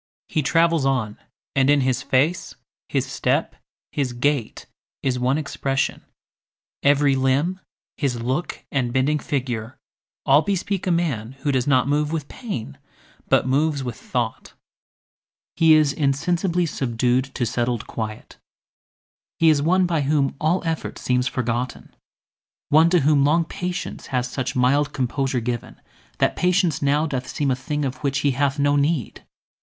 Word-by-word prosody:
He 155 - 0
travels 165 +1 +2
on, 125 -6 -1 0.4
and 135 0 +3
in 145 -1 +5
his 130 -1 0
face, 150 +7 0 0.3
his - - 0
step, - - -1 0.4
His 135 -4 -1
gait, 125 -1 -1 0.4
is 125 -2 0
one 130 +3 +1
expression; 140 -2 -2 0.8
every 140 -1 +4
limb, 135 +8 +1 0.4
His 130 -5 -1
look 130 +9 -3
and 125 -4 0
bending 135 +4 +1
figure, 125 -4 -3 0.5
all 140 +2 +6
bespeak 195 0 -2
A - - +2
man 135 -9 -1
who 145 - 0
does 130 -1 0
not 130 -2 +3
move 150 +1 +1
with 155 -4 -3
pain, 125 - -6 0.5
but - - +4
moves 140 +2 +1
With 120 -3 -4
thought—He 125 +6 -2
is 150 -2 +3
insensibly 170 +5 0
subdued 125 -3 0
To 120 - 0
settled 120 0 -1
quiet: 110 -1 -6 1.0
he 165 - +5
is 150 -2 +3
one 180 +5 +3
by 165 -3 0
whom 140 -1 +1
All 170 +5 +1
effort 165 -1 -3
seems 125 0 0
forgotten, 120 0 -3 0.7
one 160 +3 +6
to 175 -1 +3
whom 145 0 +4
Long 160 +4 +3
patience 180 +1 -5
has 125 -1 -1
such 130 0 -4
mild 140 +4 +2
composure 130 0 -1
given, 120 0 -4 0.4
That - - +1
patience 180 -2 +1
now 145 +2 +2
doth 130 -5 -3
seem 140 -2 -1
a - - +2
thing, 150 +3 -3
of 130 -1 -3
which 140 -1 -1
He 145 - +2
hath 135 +2 0
no 145 0 +2
need. 145 -3 0
140 Hz, 150 wpm, -22 LUFS, 125-155 Hz, 1.0 s, all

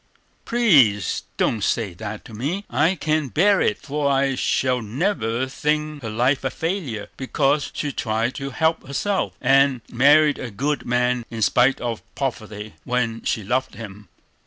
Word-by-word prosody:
"Please, 140 - +3
don't 110 -4 0
say 105 -5 0
that 105 +3 -7
to 115 - -12
me; 155 - -3
I 155 +9 +2
can't 155 -4 -1
bear 195 +4 +3
it, 210 - +1
for 145 0 -2
I 135 0 +2
shall 130 -1 0
never 120 - -1
think 150 +2 -2
her 115 - -5
life 125 +6 +1
a 135 - 0
failure, 160 - -3
because 140 +2 0
she 145 - -2
tried 115 0 -1
to 135 0 -5
help 160 +2 0
herself, 195 +8 -1
and 135 -2 +3
married 145 +4 +5
a 125 - -5
good 140 +8 -2
man 125 0 +1
in 115 -2 -3
spite 125 +5 +3
of 120 -2 -3
poverty, 110 -5 -4
when 120 -2 -1
she 110 - -1
loved 125 +6 -1
him! 105 -3 -10
130 Hz, 160 wpm, -22 LUFS, 115-150 Hz, -, married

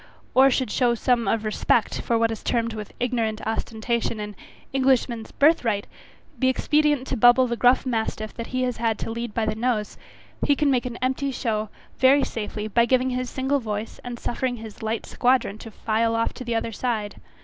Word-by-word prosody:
Or 265 +1 +7
should 260 0 0
some 240 -2 +2 0.3
show - - +3
of 225 -1 -1
respect, 215 +1 +1
for 230 - +1
what 225 0 +2
is 225 - -5
termed 230 -2 0
with 210 -2 -7
ignorant 230 -3 -1
ostentation 225 +1 -2
an 210 -1 -6 0.4
Englishman's 255 -4 +1
birth 310 +1 +4
right, 205 -4 0 0.5
be 260 - +3
expedient 295 +1 +2
to 265 - -2
bubble 245 +2 +6
the 235 -1 -2
gruff 245 +3 +4
mastiff 220 -3 -2
that 230 - -6
he 255 0 -1
has 250 -1 -1 0.2
to - - -4
lead 235 -1 -5
by 225 - +1
the 215 - 0
nose, 220 -2 -2 0.4
he 285 - +3
can 290 -1 +2
make 250 -1 +1
an 240 -1 -6
empty 265 +2 0
show, 220 -5 -2 0.3
very 270 +2 +5
safely, 210 -1 -4
by 235 +2 +3
giving 255 +1 +2
his 250 0 -2
single 270 +2 0
voice, 215 -2 -5
and 245 -1 -6
suffering 245 +1 -2
his 220 -2 -10
light 220 0 -2
squadron 245 -4 +1
to 225 - -9
file 225 +1 0
off 230 0 0
to 255 - -8
the 235 -1 -2
other 225 0 -1
side. 220 -3 -3
235 Hz, 195 wpm, -24 LUFS, 220-255 Hz, 0.5 s, Or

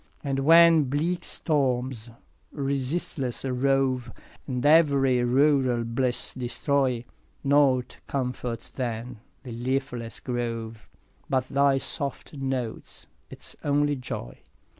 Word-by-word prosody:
5 140 - -4
And 135 - 0
when 165 +2 +7
bleak 155 +7 -1
storms 130 -5 -1 0.4
resistless 135 -1 -2
rove, 130 -1 +1 0.4
And 125 -2 -2
ev'ry 140 -5 +4
rural 130 -1 +3
bliss 120 +2 0
destroy, 130 0 0 0.4
Nought 135 -3 +2
comforts 125 -3 -4
then 120 -2 -4 0.2
the 125 - -8
leafless 125 -1 -2
grove 115 -3 -4 0.4
But 130 -1 0
thy 140 0 +3
soft 140 +2 -3
note 130 -5 -4
– - - -39
its - - -4
only 145 0 +2
joy. 125 - -7
130 Hz, 105 wpm, -26 LUFS, 125-140 Hz, 0.4 s, when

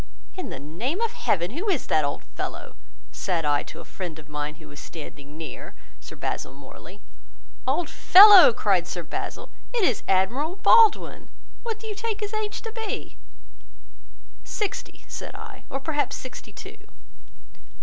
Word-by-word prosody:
'In 370 - -5
the - - -6
name 220 - -4
of 460 -1 0
heaven, 200 - 0
who 355 - -3
is 345 -9 0
that 155 - +2
old 140 - -3
fellow?' - - -6 0.4
said 170 -4 -2
I 145 -1 +2
to - - -10
a - - -13
friend 175 -4 -7
of 155 -2 -13
mine 150 0 -4
who 155 0 -15
was 145 - -11
standing 145 -1 -10
near, 160 -1 -8 0.2
(Sir - - -11
Basil - - -4
Morley). 145 +8 -13 0.7
'Old 350 - +1
fellow!' 390 - +9
cried 195 -6 +1
Sir 175 - -4
Basil, - - -6 0.2
'it 480 -4 0
is 250 - +2
Admiral 245 - +1
Baldwin. 435 +2 +4 0.3
What 455 -2 -4
do 445 - -12
you 430 - -4
take 445 +1 -4
his 415 +1 -4
age 430 -1 -3
to 450 - -6
be?' 445 -2 -5 1.3
'Sixty,' 420 -3 -5
said - - -7
I, - - -10
'or 270 - -3
perhaps 295 +1 -1
sixty 255 -1 -9
two. - - -11
255 Hz, 160 wpm, -25 LUFS, -, 1.3 s, fellow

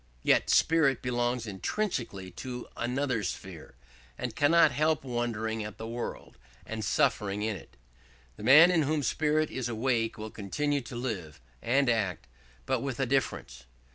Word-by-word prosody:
Yet - - +3
spirit 155 -5 +3
belongs 120 -1 -1
intrinsically 105 - -3
to 125 +7 -7
another 125 0 -1
sphere, 90 - -6 0.4
and - - -4
cannot 165 +4 +5
help 155 0 +1
wondering 115 -3 -2
at 105 -1 -8
the 110 - -6
world, 120 +1 -6 0.3
and 110 -1 -5
suffering 105 0 +1
in 110 -1 -1
it. 90 - -13 0.6
The - - -12
man 150 +9 +8
in 170 -3 +3
whom 150 0 0
spirit 155 +4 +1
is 125 -2 -3
awake 115 -1 0
will 110 0 -6
continue 145 +8 -1
to 120 - -9
live 100 - -4 0.2
and 135 +3 +2
act, 105 -8 0 0.4
but - - 0
with 135 -3 -4
a 135 - +2
difference. 65 - -2
120 Hz, 150 wpm, -29 LUFS, 110-140 Hz, 0.6 s, man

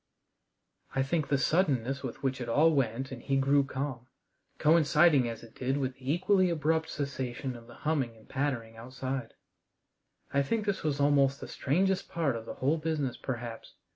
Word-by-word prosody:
I 135 - +3
think 150 +2 0
the 140 - +2
suddenness 135 -4 +1
with - - -6
which 135 -1 -1
it 120 - -4
all 155 +7 +5
went 130 -2 0
and 130 - -7
he 135 - 0
grew 140 +1 +4
calm, 130 -2 -4 0.5
coinciding 155 -4 +5
as 115 - -7
it 115 - -13
did 130 +2 -1
with 130 -2 -1
the 130 +2 -3
equally 185 +2 +3
abrupt 160 0 +1
cessation 130 -3 -3
of 115 -1 -12
the - - -13
humming 135 -7 0
and 110 - -19
pattering 130 -5 -2
outside 130 +1 -5 1.0
I 140 - +4
think 210 +10 -1
this 200 -2 -1
was 145 -2 -1
almost 140 -1 +3
the - - -7
strangest 185 +7 0
part 160 -7 0
of 115 -1 -7
the - - -6
whole 145 +5 +1
business 155 -5 -1
perhaps. 120 -3 -6
135 Hz, 175 wpm, -30 LUFS, 130-155 Hz, 1.0 s, all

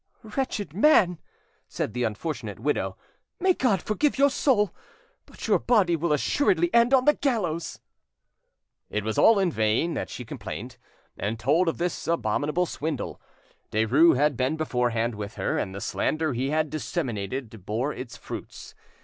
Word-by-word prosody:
"Wretched 215 - -3
man," 190 - +4 0.5
said - - -3
the 125 0 0
unfortunate 110 - -4
widow, 145 +6 -1 0.4
"may 375 0 +4
God 225 - +1
forgive 280 +8 0
your 280 +1 +4
soul; 210 - +2 0.5
but - - -9
your - - +4
body 200 -8 +3
will 165 0 -1
assuredly 175 - +2
end 235 +1 +5
on 260 -1 +4
the 295 - +6
gallows!" 185 - -2 1.1
It 105 - -2
was 110 0 -1
in 195 -5 +5
vain 110 +8 +1
that - - -3
she 125 - -7
complained, 115 -1 -7 0.4
and 110 +3 -2
told 150 +10 +2
of 165 - 0
this 175 0 -3
abominable 150 +3 0
swindle; 155 -4 -4 0.5
Derues 130 +10 +4
had 145 +1 +2
been 130 +6 0
beforehand 120 -6 0
with 105 0 -6
her, - - -1
and 95 -1 -3
the - - -5
slander 155 -2 -1
he 130 +3 -1
had 155 0 0
disseminated 120 - -4
bore 120 +8 -1
its 125 -1 -8
fruits. - - -8
155 Hz, 150 wpm, -26 LUFS, 120-185 Hz, 1.1 s, the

